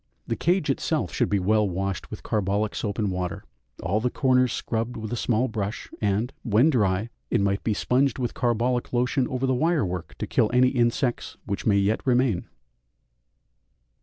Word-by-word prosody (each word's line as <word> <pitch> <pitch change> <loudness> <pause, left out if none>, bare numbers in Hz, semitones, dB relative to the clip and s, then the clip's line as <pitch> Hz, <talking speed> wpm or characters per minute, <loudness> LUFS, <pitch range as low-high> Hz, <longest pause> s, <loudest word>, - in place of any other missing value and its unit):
The - - -2
cage 175 -4 +1
itself 155 +3 -1
should 120 - +1
be 100 - +2
well 105 +2 +2
washed 95 0 -3
with - - -8
carbolic 105 0 0
soap 105 -2 -3
and 105 -4 0
water, 90 -1 -3 0.4
all 95 +6 +1
the 125 +3 0
corners 125 -2 +2
scrubbed 115 +2 -2
with 110 +1 -5
a - - 0
small 120 +1 +1
brush; 110 -3 -4
and, 105 +5 0
when 120 +7 +3
dry, 105 -3 +1 0.2
it 120 - +2
might 100 0 0
be 110 - 0
sponged 130 +4 +1
with 125 -3 -2
carbolic 120 +1 0
lotion 125 +1 +1
over 130 +1 -2
the 130 - +2
wire 160 +2 +2
work 90 -1 -5
to - - -3
kill 105 - +2
any 125 +1 +5
insects 120 0 0
which 100 +1 -3
may 100 -2 +4
yet 100 +3 +1
remain. 125 -7 +1
115 Hz, 180 wpm, -25 LUFS, 100-125 Hz, 0.4 s, any